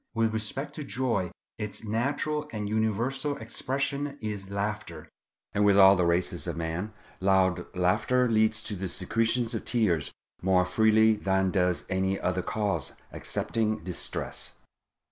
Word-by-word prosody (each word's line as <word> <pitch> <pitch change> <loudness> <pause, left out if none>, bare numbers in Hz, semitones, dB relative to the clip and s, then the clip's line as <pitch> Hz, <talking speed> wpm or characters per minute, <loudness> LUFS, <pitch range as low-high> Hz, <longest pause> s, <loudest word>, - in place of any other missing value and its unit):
With 115 -1 +2
respect 135 +6 -3
to 150 - -5
joy, 115 -6 -1 0.3
its 105 0 -4
natural 145 +7 -1
and 105 -2 -3
universal 120 +7 0
expression 140 +4 -2
is 105 -3 -5
laughter; 100 -5 -4 0.5
and 105 - +2
with 100 -1 +5
all 95 0 +9
the 90 -2 +2
races 85 +1 0
of - - -3
man 85 +5 -3 0.3
loud 95 -2 +2
laughter 105 +8 +2
leads 110 -1 +2
to 105 - -4
the 95 0 -4
secretion 115 +7 0
of - - -3
tears 95 - +1 0.3
more 90 -1 +3
freely 110 +3 +4
than 95 -2 +1
does 90 -2 +1
any 95 +1 0
other 90 0 0
cause 105 +1 -2 0.2
excepting 110 -1 -2
distress. 90 -2 -4
105 Hz, 140 wpm, -28 LUFS, 95-115 Hz, 0.5 s, all